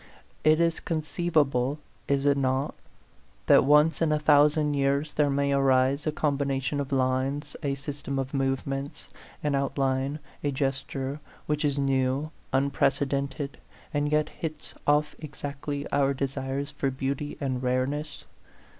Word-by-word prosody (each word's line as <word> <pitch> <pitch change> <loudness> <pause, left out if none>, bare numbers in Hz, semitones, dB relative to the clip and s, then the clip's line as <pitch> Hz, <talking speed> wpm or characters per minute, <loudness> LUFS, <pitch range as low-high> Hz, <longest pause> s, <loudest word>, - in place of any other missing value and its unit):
It 155 +1 +5
is 165 -1 +2
conceivable, 155 -5 0 0.3
is 140 0 +1
it 140 -1 +5
not, 135 +1 0 0.7
that - - +6
once 150 +4 +4
in 160 -2 +3
a 150 - +3
thou 150 -1 +6
sand 150 -1 0
years 140 +2 +1
there 150 -1 +2
may 140 0 +1
arise 135 +1 +3
a - - +2
combination 140 -2 -1
of 140 -1 -3
lines, 135 +3 0
a 140 -3 -1
system 140 0 -5
of 135 +1 -3
movements, 135 +1 -2 0.3
an 150 -1 +1
outline, 135 0 0 0.3
a 145 - +1
gesture, 135 +1 -2 0.3
which 150 0 -1
is 145 -1 +1
new, 135 +2 +1 0.2
unprecedented, 140 +1 0 0.3
and 145 0 0
yet 150 0 +2
hits 155 -2 -6
off 150 +1 +3
exactly 145 -1 -5
our 140 -1 +2
desires 135 +1 -3
for 140 -1 -1
beauty 135 +2 -3
and 130 -3 -2
rareness 130 +4 -1
140 Hz, 135 wpm, -27 LUFS, 135-150 Hz, 0.7 s, that